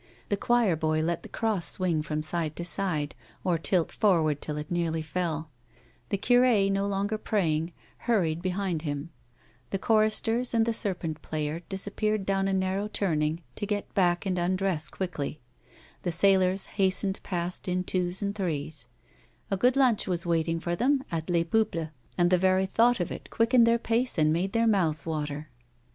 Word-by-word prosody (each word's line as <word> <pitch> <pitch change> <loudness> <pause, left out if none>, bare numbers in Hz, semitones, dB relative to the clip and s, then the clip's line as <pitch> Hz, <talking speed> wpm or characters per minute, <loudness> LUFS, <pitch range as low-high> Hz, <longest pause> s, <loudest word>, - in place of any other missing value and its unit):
The 205 - +2
cl)oir 235 -5 +2
boy 155 0 +1
let 170 +1 -1
the - - -11
cross 210 -8 0
swing 175 -3 +1
from 155 0 -3
side 155 -1 -2
to 175 - -4
side, 160 -4 0 0.3
or 175 -3 +1
tilt 170 0 +1
forward 160 -8 +2
till 150 -1 -1
it 150 +2 -6
nearly 165 -2 0
fell; 160 -1 -3 0.6
the 200 - 0
cnre, 240 -3 +4
no 195 0 0
longer 200 +2 -1
praj 195 -9 +1
ing, 165 +3 -3 0.2
hurried 175 -9 0
behind 185 -2 -1
him; 145 +1 -4 0.6
the 195 - -1
choristers 225 +3 +2
and 225 -1 +4
the 230 - 0
serpent 175 -7 -2
player 155 +1 -3
disappeared 205 +1 -1
down 195 0 +1
a 195 - 0
narrow 190 +2 0
turning 160 -5 -1
to 205 - -3
get 205 -1 -3
back 175 -2 +2
and 185 -2 0
undress 180 -2 0
quickly, 155 -5 -4 0.6
the 175 - -1
sailors 190 +2 +3 0.2
hastened 190 +1 +1
past 175 -1 -2
in 180 0 0
twos 180 +1 -1
and 200 0 -1
threes; 160 - -3 0.6
a - - +3
good 250 +6 +3
lunch 255 -6 +3
was 175 -2 -1
waiting 165 -1 0
for 170 +1 -2
them 265 +6 +2
at 165 0 -3
Les 170 -1 +2
Peuples 170 -3 0 0.3
and 175 0 +3
the 180 - +4
very 190 +1 +3
thought 230 +5 +3
of 175 - -2
it - - -7
quickened 230 +1 +4
their 230 0 +4
pace 235 +1 -1
and 155 -1 +3
made 185 +4 -1
their 230 0 +2
mouths 175 -8 +1
water. 150 -2 -4
185 Hz, 175 wpm, -28 LUFS, 160-205 Hz, 0.6 s, cnre